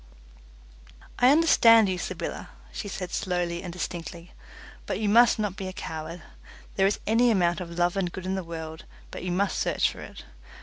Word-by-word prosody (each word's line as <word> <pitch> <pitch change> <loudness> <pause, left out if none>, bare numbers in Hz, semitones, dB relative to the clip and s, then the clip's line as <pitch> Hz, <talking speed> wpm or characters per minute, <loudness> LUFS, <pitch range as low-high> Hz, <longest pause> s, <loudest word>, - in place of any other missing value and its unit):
"I 250 - +6
understand 235 -8 +6
you, 185 -1 -2
Sybylla," - - -5 0.2
she - - -6
said 185 -2 -5
slowly 175 -2 -2
and 180 - -6
distinctly, 170 0 -6 0.6
"but - - -2
you 215 - -1
must 235 +4 +5
not 210 -3 -2
be 195 -2 -5
a 185 - -6
coward. 160 0 -7 0.5
There 195 0 +3
is 200 - -1
any 235 +3 +3
amount 180 -4 +2
of 170 -1 -7
love 175 +1 +1
and 185 -3 -1
good 185 0 -7
in 190 - -1
the 190 -1 -2
world, 160 -1 -8 0.3
but - - -7
you 180 - -2
must 190 0 0
search - - +1
for - - -11
it. - - -10
185 Hz, 185 wpm, -26 LUFS, 170-205 Hz, 0.6 s, I